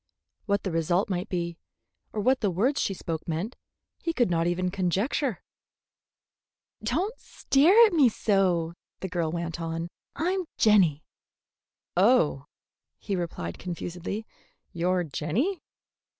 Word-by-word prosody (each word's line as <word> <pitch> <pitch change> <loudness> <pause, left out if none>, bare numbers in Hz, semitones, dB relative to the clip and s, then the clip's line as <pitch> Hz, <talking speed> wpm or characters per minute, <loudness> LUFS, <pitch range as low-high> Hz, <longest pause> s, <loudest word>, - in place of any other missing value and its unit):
What 200 -1 +1
the 190 - -2
result 175 +5 +1
might 180 +2 -2
be, 170 -2 -3 0.5
or 215 - -2
what 255 +4 +3
the 205 - +2
words 230 - +1
she 195 - -1
spoke 165 -3 -5
meant, 170 +9 -3 0.4
he 335 - -2
could 240 - +2
not 165 0 +2
even 180 +1 0
conjecture. 195 - 0 1.4
"Don't 330 - 0
stare 360 +12 +5
at 425 - +1
me 285 -7 +6
so," 185 -6 +1 0.3
the 190 - -2
girl 170 -3 -1
went 170 0 -4
on. 165 +1 -3 0.3
"I'm 365 +4 0
Jenny." 190 - +4 0.9
"Oh," 175 - +3 0.5
he 200 - -3
repeated 160 - -4
confusedly, 180 +4 -5 0.5
"you're 180 +1 +1
Jenny?" 195 - -1
185 Hz, 125 wpm, -27 LUFS, 170-235 Hz, 1.4 s, me